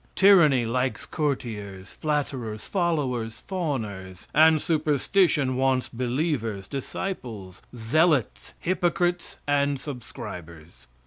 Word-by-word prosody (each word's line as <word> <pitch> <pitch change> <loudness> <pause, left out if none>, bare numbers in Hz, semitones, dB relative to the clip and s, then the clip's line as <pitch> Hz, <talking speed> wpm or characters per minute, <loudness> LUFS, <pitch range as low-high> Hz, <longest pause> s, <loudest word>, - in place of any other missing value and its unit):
Tyranny 170 -11 +6
likes 125 +3 -1
courtiers, 110 - -3
flatterers, 130 -8 -3
followers, 130 - -1
fawners, 105 - -4
and 160 +1 +6
superstition 150 -2 +2
wants 130 0 +1
believers, 120 - -2
disciples, 120 - -5
zealots, 140 +4 +1
hypocrites, 175 0 0
and 140 -1 +1
subscribers. 90 - -9
130 Hz, 80 wpm, -26 LUFS, 110-155 Hz, -, Tyranny